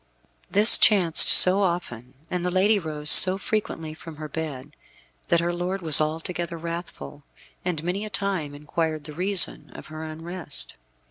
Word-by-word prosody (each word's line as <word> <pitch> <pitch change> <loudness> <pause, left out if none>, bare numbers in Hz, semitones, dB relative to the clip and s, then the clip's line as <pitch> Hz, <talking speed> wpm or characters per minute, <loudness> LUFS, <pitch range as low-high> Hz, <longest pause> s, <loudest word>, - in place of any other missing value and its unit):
This 210 +3 +6
chanced 180 -6 +3
so 185 +2 +6
often, 135 - -6 0.2
and 180 -1 -5
the 180 - -3
lady 200 +4 0
rose 155 -3 -7
so 185 0 +8
frequently 195 -7 -6
from 160 0 -14
her 155 0 -10
bed, 150 -4 -9 0.5
that 170 - 0
her 175 +1 -4
lord 180 +2 -6
was 155 -2 +6
altogether 170 +2 -5
wrathful, 170 -3 -10 0.4
and 170 -4 -6
many 180 +4 -5
a 215 - -8
time 195 -8 -5
inquired 155 +1 -5
the 150 - -11
reason 185 +1 -4
of - - -12
her 155 0 -9
unrest. 160 0 -9
170 Hz, 155 wpm, -22 LUFS, 155-185 Hz, 0.5 s, so